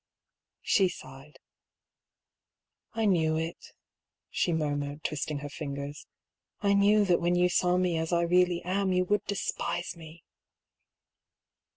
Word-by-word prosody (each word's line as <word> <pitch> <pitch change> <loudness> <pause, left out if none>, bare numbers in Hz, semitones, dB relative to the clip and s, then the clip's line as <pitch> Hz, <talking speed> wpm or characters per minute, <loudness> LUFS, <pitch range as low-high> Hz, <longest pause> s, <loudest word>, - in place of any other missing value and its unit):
She 190 -3 +3
sighed. 135 -2 -12 1.6
"I 225 -1 0
knew 160 -5 +2
it," 165 +1 -5 0.6
she 175 - 0
murmured, 145 -2 -2
twisting 150 0 -2
her - - -3
fingers. 140 -1 -6 0.5
"I 200 -1 +2
knew 205 +1 +4
that 180 -3 +2
when 175 +1 +2
you 180 0 +3
saw 180 0 +2
me 180 -3 +1
as 160 +1 -3
I 170 0 +2
really 180 0 +2
am, 190 +1 0
you 185 0 +2
would 205 +1 +1
despise 195 -3 -3
me 160 -1 -13
170 Hz, 130 wpm, -29 LUFS, 155-185 Hz, 1.6 s, knew